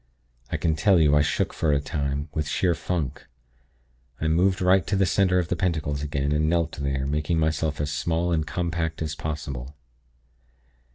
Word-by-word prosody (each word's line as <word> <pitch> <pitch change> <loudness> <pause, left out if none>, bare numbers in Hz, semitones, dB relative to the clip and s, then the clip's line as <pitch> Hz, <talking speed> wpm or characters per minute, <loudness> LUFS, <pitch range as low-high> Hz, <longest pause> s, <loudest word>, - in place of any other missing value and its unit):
I - - 0
can 80 -2 +1
tell 95 +1 +4
you, 75 -2 +4
I 75 - +5
shook 75 - 0
for 80 - +1
a 70 - +3
time, 70 -1 -2
with 75 -2 -2
sheer 85 +4 +1
funk. 80 -6 -3 0.9
I 80 - -1
moved 90 +4 +2
right 95 +1 +3
to 105 - 0
the 95 0 +3
center 95 0 +2
of 90 -2 0
the - - +1
pentacles 80 -5 -1
again, 70 -1 -1
and 75 +1 +2
knelt 85 -1 +1
there, 70 -1 -2
making 75 +3 0
myself 80 -1 0
as 75 0 -1
small 85 +3 0
and 80 -2 0
compact 85 -2 -2
as 75 -1 -3
possible. 70 -4 -5
80 Hz, 180 wpm, -25 LUFS, 75-85 Hz, 0.9 s, I